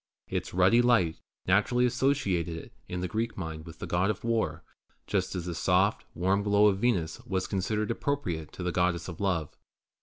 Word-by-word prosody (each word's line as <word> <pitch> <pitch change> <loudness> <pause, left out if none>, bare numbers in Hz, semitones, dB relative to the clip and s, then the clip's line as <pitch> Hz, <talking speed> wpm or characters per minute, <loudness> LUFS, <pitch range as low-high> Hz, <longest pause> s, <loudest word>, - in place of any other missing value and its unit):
Its - - -3
ruddy 95 +7 +5
light 115 -10 +3 0.3
naturally 105 +6 +3
associated 100 - +1
it - - -10 0.2
in 90 0 -3
the 90 - -1
Greek 110 +5 -2
mind 80 -3 -5
with 80 -1 -10
the - - -6
God 90 +3 +1
of 105 0 -2
War, 110 -9 0 0.4
just - - -1
as 90 -2 -3
the 90 - -3
soft, 95 +4 +2
warm 95 +3 +2
glow 100 0 +4
of 100 -2 +3
Venus 95 -9 0
was 95 -1 -1
considered 105 +3 -1
appropriate 90 - -2
to 90 - -6
the 90 - 0
Goddess 90 -1 0
of 90 -1 -7
Love. 85 -7 -1
95 Hz, 185 wpm, -29 LUFS, 85-110 Hz, 0.4 s, ruddy